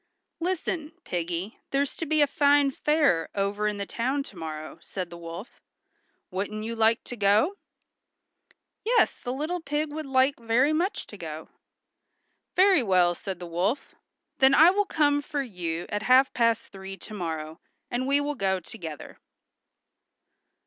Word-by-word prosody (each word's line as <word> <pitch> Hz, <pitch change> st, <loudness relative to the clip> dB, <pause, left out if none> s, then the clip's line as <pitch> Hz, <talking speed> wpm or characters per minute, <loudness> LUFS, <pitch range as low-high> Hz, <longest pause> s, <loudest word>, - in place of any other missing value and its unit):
"Listen, 335 Hz, -3 st, -2 dB
Piggy, 175 Hz, +4 st, -3 dB
there's 275 Hz, 0 st, 0 dB
to 330 Hz, -, -3 dB
be 310 Hz, 0 st, +3 dB
a -, -, +6 dB
fine 285 Hz, 0 st, +3 dB
fair 285 Hz, -, +2 dB
over 205 Hz, +1 st, 0 dB
in 210 Hz, -1 st, -1 dB
the 200 Hz, -, -3 dB
town 260 Hz, +7 st, -1 dB
to 210 Hz, -, -11 dB
morrow," 155 Hz, -1 st, -7 dB
said 180 Hz, -2 st, -6 dB
the 170 Hz, -, -8 dB
wolf. 170 Hz, +7 st, -9 dB, 0.7 s
"Wouldn't 205 Hz, +3 st, -3 dB
you 230 Hz, +1 st, -4 dB
like 225 Hz, 0 st, +3 dB
to 245 Hz, -, -7 dB
go?" 215 Hz, -, +3 dB, 1.3 s
Yes, 470 Hz, +2 st, +3 dB
the 245 Hz, -, -4 dB
little 310 Hz, +7 st, -2 dB
pig 295 Hz, 0 st, -2 dB
would 310 Hz, -1 st, -5 dB
like 265 Hz, +1 st, +3 dB
very 240 Hz, +6 st, +2 dB
much 350 Hz, +6 st, -1 dB
to -, -, -11 dB
go. -, -, -7 dB, 1.1 s
"Very 375 Hz, -4 st, +6 dB
well," 180 Hz, -5 st, +3 dB
said 190 Hz, +2 st, -6 dB
the 175 Hz, -, -8 dB
wolf. 185 Hz, +11 st, -1 dB, 0.5 s
"Then 265 Hz, +1 st, +6 dB
I 325 Hz, +4 st, +8 dB
will 410 Hz, +2 st, +1 dB
come 290 Hz, -5 st, +2 dB
for 290 Hz, -1 st, -3 dB
you 175 Hz, -7 st, -4 dB
at 205 Hz, -, -2 dB
half 260 Hz, +4 st, +5 dB
past 230 Hz, -2 st, +1 dB
three 195 Hz, 0 st, -8 dB
to 215 Hz, -, -10 dB
morrow, 160 Hz, -4 st, -4 dB, 0.3 s
and 250 Hz, +2 st, -1 dB
we 280 Hz, +1 st, +4 dB
will 290 Hz, +1 st, -1 dB
go 190 Hz, -7 st, 0 dB
together." 165 Hz, -, -9 dB
230 Hz, 155 wpm, -27 LUFS, 190-290 Hz, 1.3 s, I